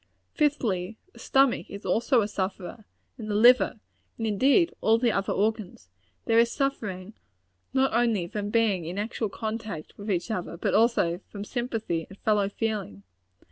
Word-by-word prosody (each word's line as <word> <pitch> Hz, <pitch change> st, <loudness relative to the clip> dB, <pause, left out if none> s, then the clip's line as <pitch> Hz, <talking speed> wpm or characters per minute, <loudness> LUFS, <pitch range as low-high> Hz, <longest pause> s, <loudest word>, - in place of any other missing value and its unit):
Fifthly 225 Hz, -, 0 dB, 0.2 s
the -, -, -15 dB
stomach 270 Hz, -2 st, +2 dB
is 200 Hz, +1 st, -9 dB
also 235 Hz, +1 st, +2 dB
a -, -, -2 dB
sufferer 195 Hz, +1 st, -5 dB, 0.3 s
and 215 Hz, -1 st, -6 dB
the 205 Hz, -, -1 dB
liver; 240 Hz, +1 st, +5 dB, 0.4 s
and, 225 Hz, -, -3 dB
indeed, 270 Hz, -, +3 dB
all 225 Hz, +1 st, +4 dB
the 235 Hz, 0 st, +2 dB
other 195 Hz, -1 st, -1 dB
organs. 205 Hz, -, -2 dB, 0.4 s
There 225 Hz, 0 st, +4 dB
is 235 Hz, 0 st, +3 dB
suffering, 215 Hz, -8 st, -3 dB, 0.6 s
not 265 Hz, 0 st, +2 dB
only 230 Hz, -6 st, +2 dB
from 205 Hz, +2 st, -4 dB
being 210 Hz, -6 st, +1 dB
in 175 Hz, +4 st, -5 dB
actual 220 Hz, +1 st, -2 dB
contact 215 Hz, -6 st, -5 dB
with 205 Hz, +2 st, -6 dB
each 190 Hz, +3 st, -1 dB
other, 180 Hz, -4 st, -4 dB
but -, -, -1 dB
also 210 Hz, -6 st, +2 dB
from 200 Hz, -1 st, -7 dB
sympathy 225 Hz, -9 st, -3 dB
and 195 Hz, -, -13 dB
fellow 205 Hz, -2 st, +1 dB
feeling. 205 Hz, -, -4 dB
215 Hz, 160 wpm, -27 LUFS, 195-235 Hz, 0.6 s, liver